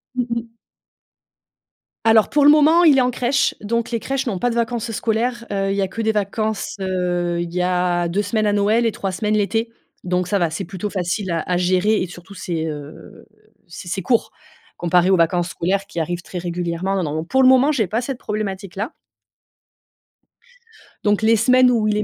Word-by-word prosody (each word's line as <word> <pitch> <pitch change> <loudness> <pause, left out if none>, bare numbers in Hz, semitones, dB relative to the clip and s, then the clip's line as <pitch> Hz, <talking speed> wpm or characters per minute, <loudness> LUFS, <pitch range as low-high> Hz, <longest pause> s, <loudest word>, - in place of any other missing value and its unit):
Mmh 250 -1 0
mh. 235 -1 -4 1.5
Alors, 225 -1 +5
pour 290 -1 +2
le 290 - +8
moment, 310 +3 +5
il 300 -5 +6
est - - +5
en 250 0 +1
crèche, 250 +3 +1
donc, 230 +2 -2
les 230 -2 -2
crèches 270 0 -2
n'ont 200 -6 -1
pas 245 +6 0
de 235 - -3
vacances 235 0 -1
scolaires, 230 +2 -1
heu. 195 0 0
Il - - -1
y 200 - +1
a 190 - 0
que 225 - -5
des 220 0 +2
vacances, 215 +1 -2
heu, 175 -2 -1
il 170 0 -5
y 180 - 0
a 180 -1 0
2 195 +5 0
semaines 215 +2 -1
à 205 - +2
Noël 210 +3 +2
et 225 - +2
3 195 -2 -4
semaines 215 +2 0
l'été. 225 +3 0 0.3
Donc, 180 0 -1
ça 200 +2 +1
va. 170 -3 +1
C'est 160 - -5
plutôt 190 +3 -5
facile 185 0 -2
à 165 - 0
à 180 - +2
gérer 185 +4 +2
et 185 - -2
surtout 175 +2 -12
c'est, 170 -4 -3
heu, 150 -2 -9 0.4
c'est 175 +1 -9
c'est 190 +2 -3
court, 230 +5 +1 0.4
comparé 175 +2 +2
aux - - +6
vacances 175 0 +1
scolaires 195 +3 -1
qui 170 -4 -3
arrivent 175 +2 -3
très 180 - -6
régulièrement. 175 +2 -2
Non, 155 -1 -2
pour 265 +11 +1
le 260 - +6
moment, 260 +3 +5
j'ai 225 -10 0
pas 220 +6 -1
cette 260 +1 -4
problématique-là 200 -1 -4 2.1
donc, 205 0 +2
les 225 +1 +4
semaines 255 +3 +4
où 230 -3 +1
il 210 - +1
est 210 - 0
200 Hz, 205 wpm, -20 LUFS, 180-230 Hz, 2.1 s, le